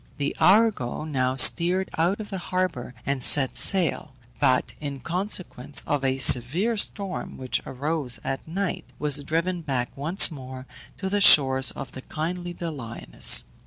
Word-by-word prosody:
The 145 -1 -3
Argo 200 - +2
now 130 -4 -2
steered 175 +7 +4
out 175 +6 -1
of 215 -1 -9
the 190 - -5
harbour 175 -9 -4
and 135 -1 -2
set 135 +1 +2
sail; 165 -7 +1 0.2
but 130 -3 0
in 140 -2 -6
consequence 170 - -3
of 145 -3 -2
a 135 0 0
severe 135 - +3
storm 200 -2 -2
which 130 -1 -3
arose 140 -2 -3
at 135 +3 -5
night, 190 +3 -4
was 145 0 -1
driven 170 +4 -2
back 130 -6 -4
once 160 +7 +5
more 130 -3 -10 0.3
to 190 - -5
the 205 +1 -1
shores 135 -7 +6
of 135 - -5
the 130 - -9
kindly 175 +5 -6
Doliones. 135 - 0
150 Hz, 150 wpm, -24 LUFS, 130-180 Hz, 0.3 s, shores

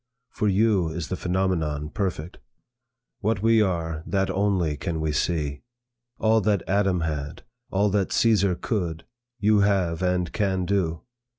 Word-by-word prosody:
For 105 - -1
you 100 -3 +3
is 80 0 -5
the - - -1
phenomenon 85 -5 -1
perfect. 90 -4 -3 0.8
What 105 -1 -1
we 115 0 +5
are, 85 -5 -1
that 95 +1 0
only 95 -5 +1
can 80 +3 -3
we 80 -1 -1
see. 75 -3 -1 0.6
All 110 0 +3
that 100 -2 +1
Adam 95 -1 +1
had, 75 -2 -4 0.3
all 100 +1 +1
that 100 -1 0
Caesar 100 -5 +3
could, 85 -6 -3 0.3
you 105 -1 +3
have 95 -4 +1
and 90 -1 0
can 95 -4 0
do. 85 -5 -1
95 Hz, 140 wpm, -25 LUFS, 80-100 Hz, 0.8 s, we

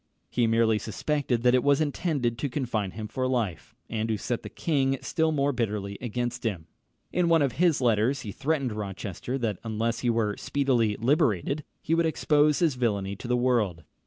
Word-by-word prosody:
He 120 -2 +2
merely 115 -1 +3
suspected 125 +1 -1
that 125 0 +5
it 125 - +3
was 140 0 +4
intended 145 -6 -1
to 145 - -1
confine 120 -7 -2
him 110 +3 -6
for 130 +4 -2
life, 115 -9 -2
and 110 0 -2
to 110 - +1
set 120 +3 -2
the - - -8
king 135 -4 0
still 160 -2 +1
more 145 -2 +1
bitterly 105 -5 -2
against 120 +1 -3
him. 95 -9 -2 0.5
In 180 -1 +2
one 165 -3 +5
of 135 - +1
his 160 +1 +2
letters 120 +3 +2
he 105 - -6
threatened 140 0 -1
Rochester 100 +3 -4
that 110 -7 -2
unless 115 +1 -1
he 120 - 0
were 110 -3 +1
speedily 125 -7 +1
liberated, 140 - +1 0.2
he 160 - 0
would 165 0 +3
expose 150 -1 +3
his 165 -5 +2
villany 100 -6 -1
to 120 - -8
the 125 0 +2
world. 115 -10 +1
120 Hz, 190 wpm, -27 LUFS, 110-140 Hz, 0.5 s, that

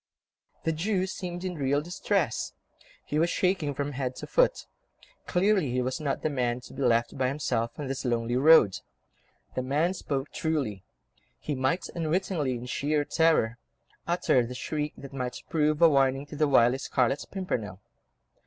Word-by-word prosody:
The 165 - +1
Jew 185 +4 0
seemed 180 -2 -5
in 185 -1 -2
real 140 -3 +1
distress; 175 - -1 0.5
he 150 - -1
was 170 +2 +3
shaking 175 -7 0
from 145 +1 -2
head 130 -2 -3
to - - -7
foot. - - +2 0.6
Clearly 190 -4 +2
he 125 +1 0
was 130 +6 -2
not 145 -3 -2
the 155 - +1
man 125 -3 0
to - - -13
be 140 - -6
left 120 0 +1
by 130 - +2
himself 125 -4 -1
on 145 - -4
this 135 0 -4
lonely 120 -1 0
road. 130 -7 +6 0.7
The 130 - -1
man 150 +8 +1
spoke 140 -6 -3
truly; 135 - -2 0.5
he 150 - -4
might 130 +7 0
unwittingly, 165 -4 -1
in 120 +1 -6
sheer 145 +4 0
terror, 150 -9 +2 0.5
utter 170 -7 +2
the 125 +2 -6
shriek 150 +3 -3
that 140 0 -10
might 125 -2 -4
prove 155 0 +2
a - - +10
warning 135 -2 +2
to 145 - -10
the 150 0 +2
wily 130 -1 +4
Scarlet 135 +1 0
Pimpernel. 110 - -3
145 Hz, 165 wpm, -28 LUFS, 125-165 Hz, 0.7 s, a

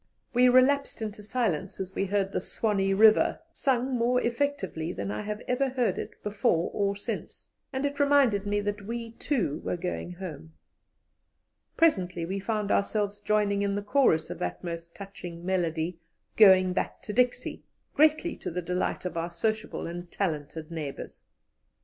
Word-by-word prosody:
We 250 +1 +6
relapsed 270 +3 +4
into 210 -1 -5
silence 205 -5 -2
as 190 0 -4
we 195 - 0
heard 195 0 0
the - - -1
"Swanee 200 -3 0
River" 215 +1 +5
sung 260 -3 0
more 245 +1 +2
effectively 240 - -1
than 100 - -4
I 105 - -3
have 210 +1 -5
ever 265 +2 +1
heard 250 -2 0
it - - -6
before 200 -5 +1
or 200 -1 0
since, 200 - -6 0.2
and 265 +2 -2
it 285 0 -2
reminded 275 -8 +4
me 205 0 +1
that 205 0 -4
we, 230 0 -4
too, 225 - -1
were - - -2
going 180 0 -4
home. 160 -4 -8 1.2
Presently 180 - +2
we 190 +3 -3
found 210 0 -1
ourselves 205 0 0
joining 205 -1 +1
in 200 0 0
the 205 - -2
chorus 205 - +2
of - - -6
that 90 - -3
most 170 -1 -6
touching 175 -4 -8
melody, 170 -2 -1 0.4
"Going 185 -3 +7
back - - -3
to 210 - -5
Dixie," 250 +2 +1 0.3
greatly 310 +2 +3
to - - -5
the 180 +1 -4
delight 180 +2 -2
of 180 - -3
our 165 +1 -1
sociable 215 +6 -2
and 175 +1 -6
talented 160 -3 -3
neighbours. 155 -4 -6
200 Hz, 160 wpm, -28 LUFS, 175-235 Hz, 1.2 s, Going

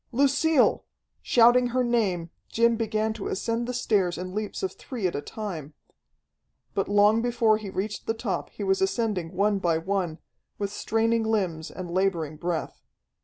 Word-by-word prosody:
Lucille! 280 +3 +3 0.4
Shouting 245 +1 +5
her 250 +1 +1
name, 195 -9 0 0.2
Jim 235 0 +3
began 220 -1 -1
to 220 -3 -5
ascend 230 +4 -2
the - - -1
stairs 190 -7 +1
in 185 +1 -5
leaps 210 - -4
of 380 - 0
three 240 -7 -6
at 180 - +1
a 145 - -2
time. 160 -10 -6 1.0
But 195 0 -1
long 205 +2 +5
before 235 -3 +2
he 210 -2 -6
reached 200 +3 -4
the 225 - 0
top 230 +2 -3
he - - -7
was 385 0 +1
ascending 220 - 0
one 200 +1 +2
by 170 -3 +1
one, 175 -1 -2 0.4
with 200 -1 -3
straining 225 +2 +1
limbs 190 -8 -1
and 180 -2 -7
laboring 170 -5 0
breath. 170 0 -3
210 Hz, 165 wpm, -26 LUFS, 185-230 Hz, 1.0 s, Shouting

